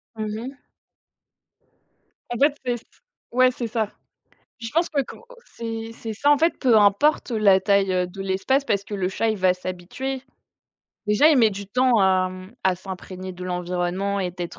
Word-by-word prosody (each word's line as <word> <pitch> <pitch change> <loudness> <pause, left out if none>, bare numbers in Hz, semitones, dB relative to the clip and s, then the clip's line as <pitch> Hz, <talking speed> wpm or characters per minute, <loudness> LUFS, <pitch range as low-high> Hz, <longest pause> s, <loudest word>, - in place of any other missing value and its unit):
Mmh 215 -1 -4
mh. 265 +4 -7 1.7
En 240 - -3
fait 285 +1 +4
c'est 245 -1 +1
ç 235 - -17 0.5
ouais 255 +1 +4
c'est 245 -1 -4
ça. 220 -2 -2 0.7
Je 230 - -5
pense 335 +3 +2
pas 280 -3 0
quan - - -11 0.3
c'est 225 -1 -6
c'est 225 -1 -6
ça 285 +7 +2
en 290 - +5
fait, 330 +3 +2
peu 245 -5 +4
importe 210 +10 +3
la 210 -4 +4
taille, 200 -1 +2
heu, 180 -1 +1
de 180 +2 -10
l'espace 195 +9 +1
parce 200 -7 0
que 205 - -7
le 190 -2 -1
chat 225 +4 -1
il 215 - -1
va 185 -1 +3
s'habituer. 185 +9 -5 0.8
Déjà, 210 +9 +5
il 310 - +5
met 225 -3 +5
du 200 0 -7
temps 250 +3 +3
à, 190 -1 +3
mmh, 185 +4 -11
à 190 -1 +3
s'imprégner 185 0 -8
de 180 0 -10
l'environnement 180 +2 -2
et 180 -2 -1
d'être 175 -1 -7
205 Hz, 185 wpm, -23 LUFS, 185-245 Hz, 1.7 s, en